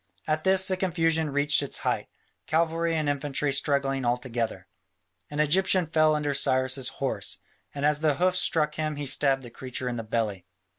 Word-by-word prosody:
At 155 0 -1
this 190 0 +3
the 185 - +1
confusion 165 -4 0
reached 145 +1 +2
its 140 - -1
height, - - -2 0.4
cavalry 165 +1 0
and 155 -2 -1
infantry 145 0 -1
struggling 140 -1 0
all 120 0 +1
together. 120 -3 -4 0.6
An 145 - -5
Egyptian 185 +4 +3
fell 155 -1 +2
under 150 -1 -1
Cyrus' 130 -1 +3
horse, 135 -2 -3 0.4
and 140 0 -2
as 150 0 +2
the 155 -2 +1
hoofs 185 +4 +1
struck 150 -2 +1
him 155 -1 -3
he 145 0 -5
stabbed 135 0 +3
the 120 - -11
creature 130 +1 -5
in 120 -1 -3
the 115 - -4
belly. 110 -5 -3
145 Hz, 180 wpm, -26 LUFS, 130-160 Hz, 0.6 s, this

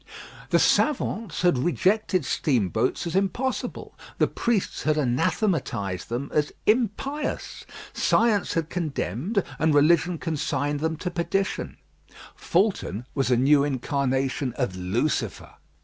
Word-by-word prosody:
The - - +4
savants 225 - +1
had 175 -8 +4
rejected 185 - +1
steamboats 120 - 0
as 170 - -3
impossible; 215 +7 -2 0.2
the - - +4
priests 230 -5 -1
had 155 0 +1
anathematised 130 - 0
them 125 +4 -3
as 150 -1 +1
impious. 255 +6 -1 0.3
Science 220 -4 +2
had 165 -2 0
condemned, 170 - -2 0.2
and 160 -2 +3
religion 170 +4 +4
consigned 145 -3 -2
them 160 +1 -1
to 180 - -4
perdition. 180 +3 -2 0.6
Fulton 170 - 0
was 135 -2 0
a 125 - +4
new 140 +3 +4
incarnation 135 -1 -1
of 125 -7 -2
Lucifer. 105 - -2
155 Hz, 115 wpm, -25 LUFS, 130-185 Hz, 0.6 s, The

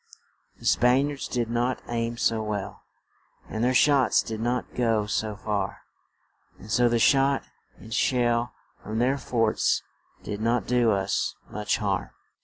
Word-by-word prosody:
The - - -14
Span 130 +4 +3
iards 140 -2 -6
did 120 -2 -1
not 120 +2 -1
aim 115 0 -2
so 115 -1 +1
well, 105 -2 -4 0.7
and 110 +1 -3
their 125 - +3
shots 140 -1 +4
did 110 -2 -5
not 120 +2 -2
go 115 -4 +1
so 105 0 -2
far, 105 -2 -3 0.7
and 105 - -11
so 120 +2 +4
the 120 - +2
shot 135 +3 +3 0.3
and 110 - -10
shell 120 0 +1 0.3
from 110 +1 -5
their 130 +4 +1
forts 115 -4 +1 0.4
did 105 0 -5
not 115 -1 +1
do 120 -2 +2
us 100 -2 0 0.2
much 105 0 -1
harm. 100 -4 -1
115 Hz, 150 wpm, -26 LUFS, 110-125 Hz, 0.7 s, shots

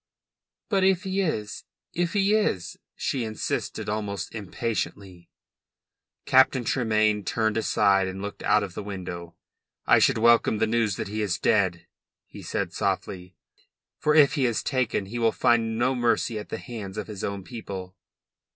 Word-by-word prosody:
"But 195 -4 +1
if 190 0 +3
he 190 0 -1
is 110 - -3 0.3
if 175 0 -1
he 200 0 +3
is?" 100 - 0 0.2
she 130 -3 -2
insisted 110 -1 -3
almost 105 -4 -3
impatiently. 100 -4 -4 1.0
Captain 130 -1 +4
Tremayne 110 -3 +1
turned 110 +1 0
aside 100 -3 +2
and 95 +1 -5
looked 100 +1 -6
out 105 - +3
of 95 -3 -6
the - - -5
window. 90 -4 -7 0.5
"I - - +6
should - - +3
welcome 115 -1 +4
the 110 - +2
news 110 -3 +1
that - - -4
he 105 +2 -3
is 100 -5 0
dead," 95 -5 +1 0.4
he - - -12
said - - -3
softly. 90 -1 -3 0.6
"For 150 0 +2
if 145 -3 +6
he 135 -5 +2
is 115 - -1
taken 130 -6 0
he 115 +5 -5
will 115 -1 +3
find 115 -1 +2
no 125 +3 +2
mercy 120 -2 0
at 105 - -9
the - - -3
hands 110 -5 -7
of 105 - -3
his 105 -3 -8
own 100 -1 -3
people." 95 -4 -7
110 Hz, 160 wpm, -26 LUFS, 100-120 Hz, 1.0 s, I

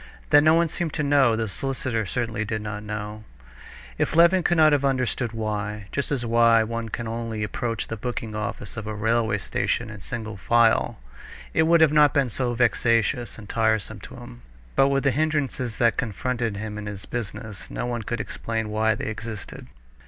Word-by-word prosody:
That 145 - +8
no 155 +2 +5
one 170 0 +3
seemed 165 0 -3
to 150 - -1
know; 140 -5 +4
the 110 0 -1
solicitor 120 0 -2
certainly 115 -2 -2
did 110 0 -3
not 105 -1 -5
know. 105 0 -6 0.8
If - - 0
Levin 170 +3 +6
could 175 0 +1
have 155 -3 +5
understood 130 -3 0
why, 105 -2 -4
just 140 - -2
as 140 -4 0
he - - -5
saw 115 - -3
why 115 -1 +5
one 115 0 -4
can 115 +2 -4
only 115 -1 -3
approach 115 +1 -2
the 115 - -5
booking 115 -1 -4
office 105 +1 -5
of 110 -1 -5
a 110 - -4
railway 110 0 +1
station 110 +4 -2
in 105 -2 -10
single 110 -1 -5
file, 115 +4 +3 0.6
it 160 0 +3
would 170 0 +5
not 150 0 +5
have 145 -3 +5
been 140 -3 +2
so 120 +1 -2
vexatious 115 -1 +1
and 105 -2 -11
tiresome 110 -2 0
to - - -11
him. - - -11 0.3
But 135 - +5
with 135 0 +1
the 140 - +3
hindrances 140 -4 -1
that 115 -3 +3
confronted 115 -1 -2
him 105 0 -5
in 105 - -6
his 100 -2 -7
business, 110 -2 -6
no - - -3
one 120 -1 -2
could 120 +2 -3
explain 110 0 -3
why 110 +1 +2
they - - -5
existed. 110 -1 -6
115 Hz, 195 wpm, -25 LUFS, 110-130 Hz, 0.8 s, That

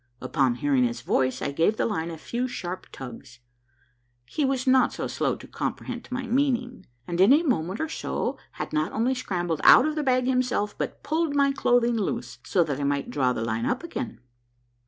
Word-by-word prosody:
I'pon 135 -5 +1
hearing 140 -1 +2
his 120 -1 -3
voice, 130 +2 0
I - - -1
gave 165 +9 +2
the - - +1
line 170 -7 -2
a 165 - -6
few 240 +9 -3
sharp 185 -7 -6
tugs. 125 0 -10 1.0
lie 300 - +2
was 265 -1 0
not 260 0 +4
slow - - -1
to - - -12
comprehend - - -4
my 255 +1 -3
meaning, 250 0 0 0.2
and 175 +1 0
in 195 +6 +7
a 300 +4 +6
moment 195 - 0
or 320 - -1
so 320 - -3
had - - -6
not 155 +1 0
only 240 +4 +1
scrambled 175 - -2
out 255 - +8
of 310 - 0
the 305 - -1
bag 255 -3 +2
himself, 250 -5 0
but - - -5
pulled 315 -1 0
my 280 -1 +4
clothing 245 -3 +2
loose, 225 +3 -3
so 180 -4 +2
that 145 -4 -3
I - - -2
might 140 0 -1
draw 130 -3 +2
the 115 -2 -2
line 115 +1 -1
up 255 +6 -1
again. 260 -9 -5
220 Hz, 200 wpm, -26 LUFS, -, 1.0 s, out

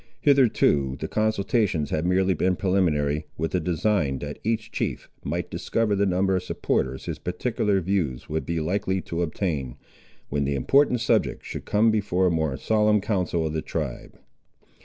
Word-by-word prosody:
Hitherto 110 - +3
the 80 - -3
consultations 105 - 0
had 80 +3 0
merely 95 +1 +3
been 90 +2 +1
preliminary, 80 -6 +1
with 80 +1 -2
a 90 - +2
design 85 -4 0
that 75 +2 -6
each 110 0 -1
chief - - -3 0.2
might - - -3
discover 115 -3 0
the 100 0 +2
number 95 +1 +2
of 90 - 0
supporters 65 -6 -2
his - - -4
particular 105 +1 0
views 85 -9 -1
would 80 +1 -2
be 85 -1 -2
likely 95 +3 -1
to 85 -1 -4
obtain, 75 -7 -2 0.5
when 70 0 0
the 70 0 0
important 125 - +3
subject 115 - +1
should - - -6
come 110 +2 +3
before 95 -4 +1
a 90 - +3
more 80 -5 0
solemn 105 -1 +3
council 90 -5 -1
of 80 - -2
the 80 - -1
tribe. - - -5
90 Hz, 165 wpm, -25 LUFS, 80-105 Hz, 0.5 s, Hitherto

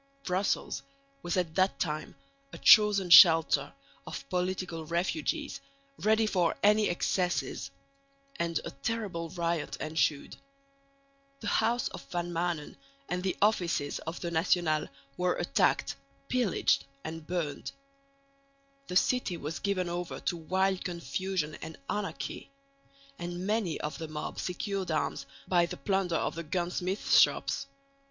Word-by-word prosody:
Brussels 180 -6 -1 0.4
was 175 +1 -2
at 170 -3 0
that 190 +2 +2
time 155 -2 -3 0.4
a - - -8
chosen 205 -4 +6
shelter 165 - +8 0.4
of 140 - -7
political 180 -2 -2
refugees, 170 - -2 0.4
ready 220 +1 +3
for 180 -5 +1
any 210 +1 +5
excesses; 180 +1 -1 0.7
and 170 -1 0
a - - -5
terrible 170 +3 -3
riot 170 -3 -2
ensued. 155 -2 -1 1.0
The 210 - -2
house 235 +4 +2
of - - -8
Van 175 0 -2
Maanen 170 -3 -2 0.3
and 180 0 -1
the 185 0 -1
offices 175 -9 +1
of 160 +2 -6
the 170 - -3
National 160 -2 +2 0.3
were 180 0 +1
attacked, - - +1 0.3
pillaged 245 -6 +2 0.2
and 160 0 -7
burnt. 170 -5 -3 1.2
The 180 - -5
city 195 -3 +2
was 155 +1 -5
given 195 -3 0
over 175 0 -4
to - - -1
wild 190 +3 0
confusion 170 0 -2
and 160 0 -7
anarchy; 165 -10 -4 0.7
and 175 +1 -4
many 210 -5 0
of 150 - -4
the 160 - -4
mob 150 0 -5
secured 190 +1 -3
arms 155 -3 -1 0.2
by 175 -2 +3
the - - -6
plunder 185 +3 0
of - - 0
the 170 - -5
gun 175 +2 -2
smiths' 185 +3 +2
shops. - - +2
175 Hz, 130 wpm, -30 LUFS, 165-190 Hz, 1.2 s, shelter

